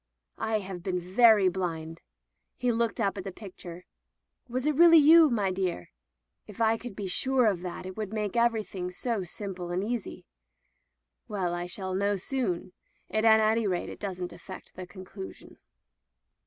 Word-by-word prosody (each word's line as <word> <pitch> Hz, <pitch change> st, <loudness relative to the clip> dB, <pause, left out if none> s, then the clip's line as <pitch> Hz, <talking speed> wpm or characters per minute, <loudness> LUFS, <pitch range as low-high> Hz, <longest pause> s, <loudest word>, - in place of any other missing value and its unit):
" -, -, -47 dB
I 220 Hz, 0 st, 0 dB
have 190 Hz, -2 st, -7 dB
been 180 Hz, 0 st, -2 dB
very 205 Hz, +2 st, +5 dB
blind." 165 Hz, -3 st, -3 dB, 0.6 s
He 250 Hz, -1 st, +1 dB
looked 230 Hz, +1 st, 0 dB
up 200 Hz, -2 st, 0 dB
at -, -, -5 dB
the 195 Hz, -, -5 dB
picture. 180 Hz, -3 st, -10 dB, 0.6 s
"Was 255 Hz, +2 st, -2 dB
it 305 Hz, -, +3 dB
really 335 Hz, +2 st, +8 dB
you, 315 Hz, +1 st, +8 dB
my 205 Hz, -6 st, +1 dB
dear? 185 Hz, -, -3 dB, 0.6 s
If 210 Hz, -1 st, -12 dB
I 225 Hz, 0 st, +3 dB
could 230 Hz, -2 st, -8 dB
be 205 Hz, -, -5 dB
sure 260 Hz, +6 st, +1 dB
of 195 Hz, -5 st, +1 dB
that 180 Hz, 0 st, -6 dB
it 185 Hz, 0 st, -7 dB
would 210 Hz, -2 st, -4 dB
make 210 Hz, -2 st, -2 dB
every 235 Hz, -2 st, +2 dB
thing 180 Hz, -2 st, -5 dB
so 220 Hz, +4 st, -2 dB
simple 180 Hz, 0 st, -6 dB
and 180 Hz, +2 st, -1 dB
easy. 230 Hz, 0 st, -4 dB, 1.0 s
Well, 185 Hz, -4 st, -2 dB
I 175 Hz, 0 st, -3 dB
shall 190 Hz, -1 st, -4 dB
know 200 Hz, +2 st, +1 dB
soon, 190 Hz, -4 st, -3 dB, 0.4 s
and 215 Hz, +1 st, +2 dB
at 220 Hz, 0 st, +7 dB
any 220 Hz, 0 st, +2 dB
rate 180 Hz, -2 st, -1 dB
that -, -, -9 dB
doesn't 185 Hz, -3 st, -5 dB
affect 190 Hz, -, -11 dB
the 185 Hz, -1 st, -8 dB
conclusion." 190 Hz, +1 st, -10 dB
200 Hz, 175 wpm, -28 LUFS, 180-225 Hz, 1.0 s, really